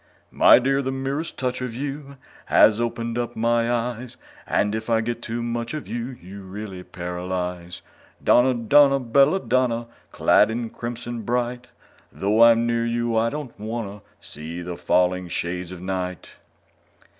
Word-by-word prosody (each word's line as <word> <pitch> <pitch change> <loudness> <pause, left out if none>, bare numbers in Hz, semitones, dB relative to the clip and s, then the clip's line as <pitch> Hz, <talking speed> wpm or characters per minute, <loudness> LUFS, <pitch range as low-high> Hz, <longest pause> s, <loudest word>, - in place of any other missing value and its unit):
_My - - +7
dear, 135 +1 +2
the 130 -1 -2
merest 135 +4 -3
touch 130 -1 -2
of 125 -3 -4
you 140 +1 -6 0.3
Has 110 +1 +5
opened 115 0 -2
up 120 0 -3
my 115 +1 +1
eyes; 120 0 -3 0.3
And 105 +1 +1
if 110 +1 -4
I 115 -1 +3
get 120 +1 -3
too 120 0 -4
much 120 +3 -3
of 155 - -6
you, 120 +2 -5
You 95 +3 -10
really 95 0 -7
paralyze! 90 0 -5 0.4
Donna, 125 +1 +4
Donna, 140 +4 +5
bella 135 +8 +3
Donna, 125 -5 0 0.3
Clad - - +4
in 115 0 -3
crimson 120 0 -5
bright, 120 +2 -2 0.4
Though 105 +3 +1
I'm 115 0 +6
near 115 0 0
you, 115 0 -1
I 115 +1 +2
don't 145 -2 -6
wanna 105 -2 -5 0.2
See 80 +3 -8
the 90 0 -5
falling 90 +1 +1
shades 90 +1 -4
of 90 -2 -9
night! 90 -1 -4
115 Hz, 155 wpm, -23 LUFS, 100-125 Hz, 0.4 s, My